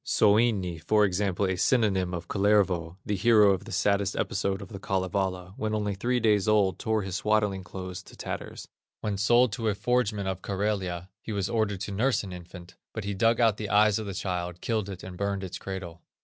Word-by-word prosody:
Soini, 105 -5 +2
for 105 -1 +4
example, 100 0 0
a 95 0 0
synonym 95 -3 +2
of 85 -1 -5
Kullervo, 95 -4 +1
the 105 - -1
hero 105 0 +5
of 95 +1 -2
the - - -9
saddest 100 0 +1
episode 95 0 -1
of 95 - -9
the 100 - -8
Kalevala 95 -1 -2
when 110 0 -1
only 105 -1 -1
three 120 +6 0
days 105 -3 +2
old, 105 -3 +3
tore 110 -1 0
his 95 0 -3
swaddling 105 -3 +1
clothes 90 0 -7
to - - -15
tatters. - - -6 0.3
When 105 -2 -1
sold 120 +4 +4
to 115 -1 -3
a 105 - +1
forgeman 105 -2 0
of 95 -1 -3
Karelia, 95 -3 -2
he - - -6
was 100 -3 -2
ordered 105 -4 0
to 105 - -4
nurse 120 +6 +1
an 95 -2 -7
infant, 90 0 -11 0.2
but 110 - -3
he 100 0 -2
dug 115 +4 +2
out 115 -3 +4
the 105 -2 -4
eyes 105 0 +4
of 110 - -5
the 100 - -5
child, 90 -3 -3
killed 110 -2 -1
it, 95 -2 -8
and 90 - -8
burned 100 0 -2
its 95 -1 -6
cradle. 95 -3 -7
100 Hz, 205 wpm, -27 LUFS, 95-105 Hz, 0.3 s, hero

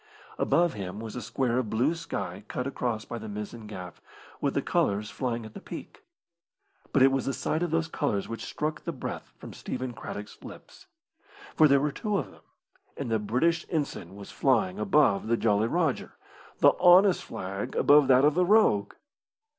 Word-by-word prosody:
Above 175 0 +2
him 100 -1 -6
was 110 -1 -7
a 125 - -4
square 120 +1 0
of 120 -4 -3
blue 125 +9 +1
sky 100 - -5
cut 125 - -4
across 120 -5 -3
by 120 - -6
the 110 0 -8
mizzen 105 +2 -7
gaff, 90 -4 -9 0.4
with - - 0
the - - +2
colours 105 +1 0
flying 120 -3 -3
at 110 - -11
the - - -8
peak. - - -9 0.9
But 135 - +4
it 135 - +6
was 135 -1 -1
the 135 - 0
sight 155 - -1
of 175 - 0
those 165 0 0
colours 140 -11 -2
which 115 - -6
struck 155 +1 -3
the - - -4
breath - - -6
from - - -10
Stephen 130 -1 -5
Craddock's 105 -2 -8
lips. - - -13 0.7
For 155 - +6
there 140 -1 +5
were 145 +1 0
two 210 +6 -2
of - - -4
them, - - -19 0.6
and 115 - -4
the 110 - +2
British 130 +11 +1
ensign 140 - -3
was 100 -1 -10
flying 185 +8 +1
above 150 - +3
the 115 +1 +2
Jolly 110 -1 +2
Rodger 160 -1 -1 0.5
the - - +7
honest 185 +1 +6
flag 95 +2 -5
above 145 -1 +5
that 130 +1 +5
of 150 - +4
the 180 +3 +2
rogue. 175 - +3
125 Hz, 185 wpm, -28 LUFS, 105-155 Hz, 0.9 s, the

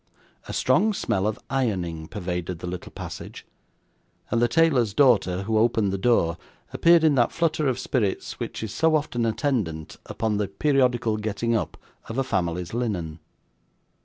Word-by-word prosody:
A - - -5
strong 220 0 +2
smell 95 - 0
of 110 - -2
ironing 90 -12 -2
pervaded 90 -3 -4
the 85 - -8
little 90 0 -6
passage; - - -8 0.9
and 115 +1 +2
the 120 - +4
tailor's 125 -6 +2
daughter, 100 -9 +3
who 110 +1 +1
opened 110 -3 +2
the - - -1
door, 90 -7 +2 0.4
appeared 170 -1 +5
in 155 -2 +5
that 120 -3 +3
flutter 160 -3 0
of 130 -2 0
spirits 115 -8 -2
which - - -5
is 110 -2 -5
so 160 +4 +3
often 120 -6 0
attendant 110 - -2
upon 110 -2 -1
the 105 -1 0
periodical 120 0 +1
getting 110 +2 -1
up 110 - -2 0.3
of 115 - -5
a 135 - +2
family's 90 -7 -2
linen. 90 -10 -3
110 Hz, 160 wpm, -25 LUFS, 95-130 Hz, 0.9 s, appeared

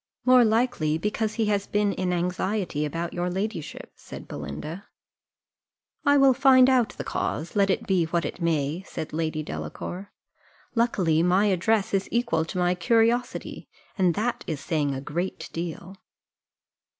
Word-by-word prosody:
"More 255 -1 +7
likely 220 -9 +1
because 210 +4 -2
he 225 - +1
has 205 -1 0
been 205 -1 +1
in 185 -1 -1
anxiety 180 -2 -1
about 165 +3 -4
your 175 0 -1
ladyship," 190 -4 -4
said - - -11
Belinda. 155 - -7 1.2
"I 285 0 +4
will 275 -1 +6
find 260 -1 +6
out 245 -4 +3
the - - -4
cause, 165 +6 -3
let 200 -1 +3
it 190 - 0
be 185 -4 +2
what 170 +1 -1
it - - -6
may," 160 0 0
said 160 -5 -7
Lady 155 -1 -2
Delacour: 150 - -6 0.6
"luckily 185 -9 +2
my 180 +4 +3
address 200 +3 +1
is 195 0 0
equal 235 -10 +1
to 165 - -6
my 180 0 +2
curiosity, 230 +7 0 0.3
and 180 -5 +2
that 235 +3 -1
is 155 -4 -3
saying 145 -2 -1
a 135 - -5
great 170 +6 -4
deal." 170 +3 -5
185 Hz, 150 wpm, -25 LUFS, 165-220 Hz, 1.2 s, More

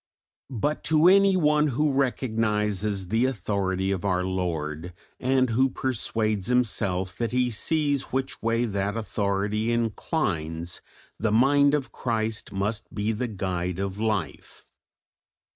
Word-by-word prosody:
But 145 +7 -1
to 160 +2 +4
anyone 180 -6 +5
who 145 +2 +1
recognises 105 -7 0
the 115 +4 +2
authority 95 -5 -1
of 95 -1 -2
our 90 -2 +1
Lord, 85 -3 -3 0.3
and 130 -1 +2
who 130 +4 +3
persuades 110 -6 -1
himself 100 -7 0
that 115 -2 -1
he 125 0 +1
sees 145 +4 +1
which 135 +1 -3
way 115 +1 +1
that 100 0 -2
authority 105 +1 -1
inclines, 90 - -2 0.4
the 110 +1 0
mind 140 +5 +4
of 140 -3 -3
Christ 110 -2 -2
must 100 +2 -2
be 105 +1 -1
the 120 +3 -2
guide 90 -4 -3
of 100 +1 -3
life. 105 -6 -3
110 Hz, 125 wpm, -26 LUFS, 95-130 Hz, 0.4 s, anyone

